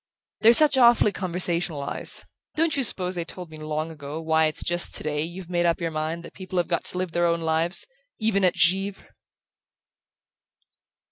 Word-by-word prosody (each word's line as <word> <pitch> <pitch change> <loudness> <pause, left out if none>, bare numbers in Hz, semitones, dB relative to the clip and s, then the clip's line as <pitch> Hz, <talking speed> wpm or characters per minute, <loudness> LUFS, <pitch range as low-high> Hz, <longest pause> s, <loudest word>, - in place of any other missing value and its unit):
"They're 230 +1 +6
such 285 0 +6
awfully 235 -3 +5
conversational 175 -5 -1
eyes! - - -3 0.3
Don't 325 0 +2
you 275 - 0
suppose 185 -5 +1
they 175 -2 -3
told 175 0 -8
me 155 - -10
long 155 +1 -4
ago 150 0 -7
why 160 0 +2
it's 155 - -2
just 175 0 +1
today 150 -1 -1
you've 175 +3 -6
made 175 -1 0
up 170 - +1
your 165 -2 -3
mind 160 +2 -3
that - - -12
people 185 -1 -7
have 175 - +1
got 170 -2 -2
to - - +1
live 185 -2 -3
their 175 +1 +1
own 170 0 0
lives 165 +2 0 0.3
even 215 -3 0
at 180 - +3
Givre?" 195 +3 0
175 Hz, 185 wpm, -24 LUFS, 160-190 Hz, 0.3 s, They're